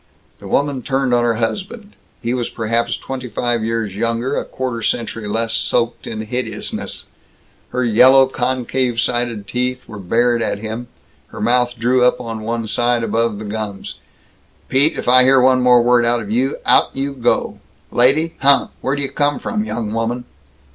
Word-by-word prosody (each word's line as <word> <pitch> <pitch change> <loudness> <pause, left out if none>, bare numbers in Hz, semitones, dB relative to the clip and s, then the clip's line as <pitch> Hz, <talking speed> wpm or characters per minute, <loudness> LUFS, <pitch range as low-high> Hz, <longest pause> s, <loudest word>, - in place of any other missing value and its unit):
The - - -10
woman 140 -2 0
turned 135 -1 0
on 120 0 +3
her 115 -1 +1
husband. 200 - -4 0.3
He 120 +1 -1
was 120 -2 -2
perhaps 115 +1 -1
twenty 130 -1 -6
five 120 0 -1
years 110 -3 -2
younger; 115 +5 -1
a - - -1
quarter 125 -3 -4
century 115 -1 -2
less 115 +2 -1
soaked 115 0 0
in 110 -1 -4
hideousness. 110 -1 -4 0.6
Her 125 - -1
yellow, 130 +4 +6
concave 130 -1 -1
sided 120 -4 -1
teeth 125 +3 -3
were 105 - -9
bared 115 +5 +1
at - - -1
him, 110 +3 -6 0.4
her - - -10
mouth 120 +2 +1
drew 125 +2 +2
up 125 - +3
on 115 -2 -5
one 115 +1 -3
side 120 +2 +1
above 115 -2 0
the 110 - -7
gums. 105 -1 -5 0.7
"Pete, 140 +4 +2
if - - -5
I 130 +1 +7
hear 135 +1 +5
one 130 0 +4
word 125 -1 +5
more 120 0 +4
out 120 0 +2
of 105 -2 -6
you, 130 +5 0
out - - +4
you 140 +1 -2
go. 125 -3 0 0.3
Lady! 150 +7 +3
Huh! 140 +1 +4
Where 135 - 0
d' 140 - -3
you 135 - -2
come 145 0 +1
from, 215 -3 -2
young 110 - -4
woman?" 115 +2 -2
120 Hz, 175 wpm, -18 LUFS, 115-130 Hz, 0.7 s, I